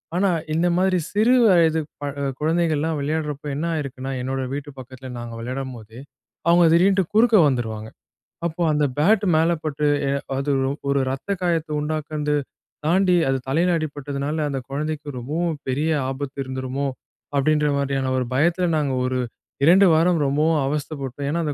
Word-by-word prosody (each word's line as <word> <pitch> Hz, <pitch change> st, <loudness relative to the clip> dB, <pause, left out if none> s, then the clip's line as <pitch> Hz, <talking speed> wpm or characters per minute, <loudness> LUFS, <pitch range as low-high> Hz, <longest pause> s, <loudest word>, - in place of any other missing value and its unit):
ஆனா, 195 Hz, +2 st, +2 dB, 0.2 s
இந்த 165 Hz, +2 st, +2 dB
மாதிரி 185 Hz, 0 st, +2 dB
சிறு 220 Hz, +5 st, +3 dB
வயது 165 Hz, -4 st, +4 dB, 0.2 s
ப -, -, -6 dB, 0.2 s
அ -, -, -1 dB, 0.2 s
குழந்தைகள்லாம் 160 Hz, -1 st, +1 dB
விளையாடுறப்போ, 150 Hz, 0 st, -3 dB
என்ன 155 Hz, +4 st, -2 dB
ஆயிருக்குன்னா, 135 Hz, -3 st, -4 dB
என்னோட 135 Hz, +1 st, -2 dB
வீட்டு 145 Hz, +1 st, -5 dB
பக்கத்துல 130 Hz, 0 st, -10 dB
நாங்க 120 Hz, -1 st, -7 dB
விளையாடும்போது, 120 Hz, -2 st, -6 dB, 0.5 s
அவுங்க 170 Hz, 0 st, +6 dB
திடீர்னுட்டு 190 Hz, +3 st, +4 dB
குறுக்க 230 Hz, +1 st, +5 dB
வந்துருவாங்க. 110 Hz, -5 st, -2 dB, 0.6 s
அப்போ 170 Hz, +1 st, -6 dB
அந்த 150 Hz, 0 st, +2 dB
பேட்டு 205 Hz, +7 st, +3 dB
மேல 165 Hz, +2 st, +3 dB
பட்டு, 150 Hz, -1 st, -2 dB, 0.2 s
எ -, -, +1 dB, 0.3 s
அது 140 Hz, +1 st, -1 dB, 0.2 s
ஒ -, -, -1 dB, 0.2 s
ஒரு 140 Hz, 0 st, +2 dB
ரத்த 135 Hz, +8 st, -6 dB
காயத்த 165 Hz, -3 st, 0 dB
உண்டாக்குன்து 150 Hz, 0 st, -2 dB, 0.5 s
தாண்டி, 180 Hz, +1 st, +3 dB
அது 135 Hz, -, +2 dB
தலையில 170 Hz, +5 st, +2 dB
அடிபட்டதுனால, 145 Hz, 0 st, -4 dB
"அந்த 135 Hz, -1 st, -2 dB
கொழந்தைக்கு 145 Hz, 0 st, -4 dB
ரொம்பவும் 160 Hz, +6 st, -2 dB
பெரிய 145 Hz, +5 st, 0 dB, 0.2 s
ஆபத்து 135 Hz, +1 st, -5 dB
இருந்துருமோ!" 130 Hz, +1 st, -3 dB, 0.5 s
அப்படின்ற 150 Hz, +2 st, +2 dB
மாதிரியான 135 Hz, -1 st, -1 dB
ஒரு 125 Hz, -, -1 dB
பயத்துல, 170 Hz, +6 st, +2 dB
நாங்க 140 Hz, -3 st, 0 dB
ஒரு 130 Hz, 0 st, -1 dB, 0.5 s
2 190 Hz, +4 st, +7 dB
வாரம் 170 Hz, +1 st, +3 dB
ரொம்பவும் 150 Hz, +3 st, +2 dB
அவஸ்தைப்பட்டோம். 140 Hz, -2 st, -4 dB
ஏன்னா 165 Hz, +3 st, -1 dB
அந்த 150 Hz, -, -1 dB
150 Hz, 150 wpm, -22 LUFS, 135-165 Hz, 0.6 s, 2